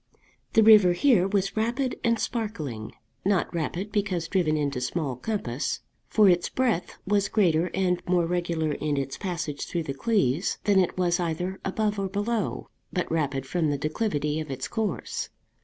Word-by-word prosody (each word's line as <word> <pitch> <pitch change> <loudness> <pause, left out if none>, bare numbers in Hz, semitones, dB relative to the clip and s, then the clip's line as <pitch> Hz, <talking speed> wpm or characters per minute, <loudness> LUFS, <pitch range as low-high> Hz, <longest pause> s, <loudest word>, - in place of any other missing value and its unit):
The 225 - +6
river 210 -5 +8
here 190 -1 +4
was 195 -1 0
rapid 240 +4 -1
and 230 0 +3
sparkling; 155 - -4 0.3
not 195 -2 +1
rapid 170 +5 -3
because 190 -5 -1
driven 165 -5 +1
into 140 -4 -1
small 135 +1 -2
compass, 135 - -3 0.3
for 215 -2 +5
its 175 -2 +3
breadth 235 -9 -1
was 200 0 +1
greater 175 -5 +2
and 180 -2 +1
more 175 -1 +3
regular 170 -2 -1
in 150 0 -1
its 135 -1 -2
passage 170 -7 -4
through 170 -2 -2
the 140 - -4
Cleeves 175 - +1
than 200 -2 +4
it 185 -1 +1
was 175 0 +2
either 180 +3 -2
above 210 +1 -1
or 195 - 0
below, 205 +2 -2 0.2
but 180 - -2
rapid 140 -4 0
from 160 +1 0
the 145 - 0
declivity 155 -1 -1
of 155 -2 -5
its 130 -1 -4
course. 220 -2 -3
180 Hz, 165 wpm, -26 LUFS, 155-205 Hz, 0.3 s, river